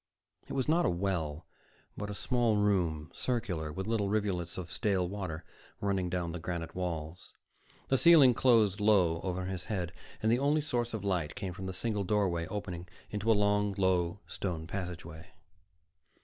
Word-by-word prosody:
It -, -, -6 dB
was 130 Hz, -2 st, 0 dB
not 165 Hz, +3 st, +3 dB
a -, -, +3 dB
well, 85 Hz, -3 st, -2 dB, 0.5 s
but 105 Hz, 0 st, -5 dB
a 105 Hz, -, -4 dB
small 120 Hz, -2 st, +2 dB
room, 90 Hz, -7 st, +1 dB
circular, 90 Hz, -11 st, -2 dB
with 95 Hz, +5 st, -4 dB
little 110 Hz, -2 st, 0 dB
rivulets 100 Hz, -5 st, -1 dB
of 90 Hz, -1 st, -6 dB
stale 95 Hz, -1 st, +1 dB
water 90 Hz, -4 st, -5 dB, 0.4 s
running 95 Hz, -3 st, 0 dB
down 85 Hz, -1 st, -2 dB
the 90 Hz, -, -5 dB
granite 85 Hz, -1 st, -4 dB
walls. 85 Hz, -1 st, -5 dB, 0.5 s
The 135 Hz, -, +3 dB
ceiling 160 Hz, -7 st, +8 dB
closed 115 Hz, -6 st, +4 dB
low 90 Hz, -6 st, +4 dB
over 95 Hz, 0 st, -2 dB
his 95 Hz, -1 st, -3 dB
head, 90 Hz, -5 st, -3 dB, 0.3 s
and 110 Hz, -, +3 dB
the 120 Hz, -, +3 dB
only 145 Hz, +3 st, +2 dB
source 120 Hz, -5 st, -1 dB
of 105 Hz, -, -5 dB
light 90 Hz, -6 st, -1 dB
came 95 Hz, -3 st, -4 dB
from 95 Hz, 0 st, -6 dB
the -, -, -2 dB
single 105 Hz, +2 st, -1 dB
doorway 90 Hz, -5 st, +1 dB
opening 90 Hz, -4 st, -5 dB, 0.2 s
into 105 Hz, +2 st, +1 dB
a 110 Hz, -, +4 dB
long, 105 Hz, -1 st, +2 dB
low 95 Hz, -1 st, +1 dB
stone 85 Hz, -5 st, -4 dB
passageway. 85 Hz, -1 st, -6 dB
95 Hz, 170 wpm, -31 LUFS, 85-105 Hz, 0.5 s, ceiling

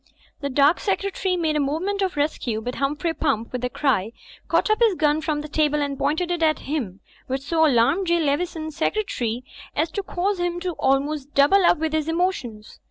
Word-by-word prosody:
The 280 Hz, -, -3 dB
dark 285 Hz, +5 st, +4 dB
secretary 385 Hz, -1 st, -1 dB
made 320 Hz, -3 st, 0 dB
a -, -, +2 dB
movement 330 Hz, +9 st, -1 dB
of 375 Hz, -4 st, 0 dB
rescue, 275 Hz, -6 st, -1 dB
but 245 Hz, +3 st, -4 dB
Humphrey 295 Hz, +5 st, -1 dB
Pump, 250 Hz, -9 st, -1 dB
with 250 Hz, -1 st, -3 dB
a 250 Hz, -, 0 dB
cry, 235 Hz, -6 st, 0 dB, 0.3 s
caught 430 Hz, -, +2 dB
up 430 Hz, -, +2 dB
his 445 Hz, -5 st, +4 dB
gun 305 Hz, -1 st, +2 dB
from 310 Hz, -2 st, -1 dB
the 300 Hz, -, -7 dB
table 300 Hz, -1 st, +1 dB
and 285 Hz, -1 st, -1 dB
pointed 320 Hz, +5 st, 0 dB
it 345 Hz, -1 st, -1 dB
at 310 Hz, -1 st, +3 dB
him, 245 Hz, -10 st, -3 dB, 0.3 s
which 265 Hz, +1 st, -3 dB
so 320 Hz, +2 st, +3 dB
alarmed 285 Hz, +9 st, +2 dB
J. 340 Hz, 0 st, +3 dB
Leveson, 315 Hz, +1 st, -1 dB
Secretary, 270 Hz, -, -2 dB, 0.3 s
as 315 Hz, +2 st, 0 dB
to 400 Hz, -, -2 dB
cause 385 Hz, +1 st, -2 dB
him 350 Hz, 0 st, -1 dB, 0.2 s
almost 275 Hz, +1 st, +1 dB
to 290 Hz, -, -35 dB
double 295 Hz, +8 st, +5 dB
up -, -, +4 dB
with 315 Hz, 0 st, -2 dB
his 315 Hz, 0 st, 0 dB
emotions. 325 Hz, -, -2 dB
305 Hz, 200 wpm, -23 LUFS, 275-350 Hz, 0.3 s, double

